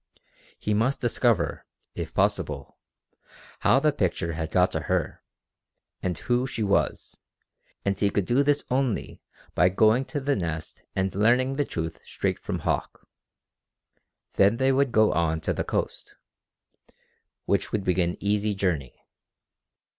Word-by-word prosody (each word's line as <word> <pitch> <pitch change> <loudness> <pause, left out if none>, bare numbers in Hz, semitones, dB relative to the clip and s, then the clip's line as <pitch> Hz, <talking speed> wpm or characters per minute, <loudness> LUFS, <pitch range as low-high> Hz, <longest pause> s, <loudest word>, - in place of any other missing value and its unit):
He 105 - -1
must 115 +6 +1
discover, 120 -4 +1 0.3
if - - -5
possible, - - -1 0.8
how 135 - +4
the 150 +2 +3
picture 90 - -1
had 80 0 -3
got - - +3
to - - -1
her, - - -1 0.8
and 90 -1 -2
who 125 +1 0
she 115 -4 -3
was, 100 -1 0 0.7
and 100 0 +1
he 100 - +3
could 100 -2 0
do 125 +7 +3
this 145 0 +2
only 130 -4 -1 0.3
by 90 - +4
going 110 +7 +3
to 145 - -3
the 140 +1 0
Nest 80 -4 -4
and 95 -1 0
learning 125 +6 +3
the 145 0 0
truth 80 -5 -4
straight - - -2
from - - -4
Hauck. - - -2 1.3
Then 100 +4 +4
they 130 +1 +3
would 135 -1 +2
go 110 -1 +4
on 80 0 +1
to - - -1
the - - -2
coast, - - -3 1.3
which - - 0
would 105 -2 -1
be 90 -1 +1
an 85 0 -1
easy 105 +1 0
journey. 80 -10 -2
105 Hz, 145 wpm, -26 LUFS, 90-130 Hz, 1.3 s, how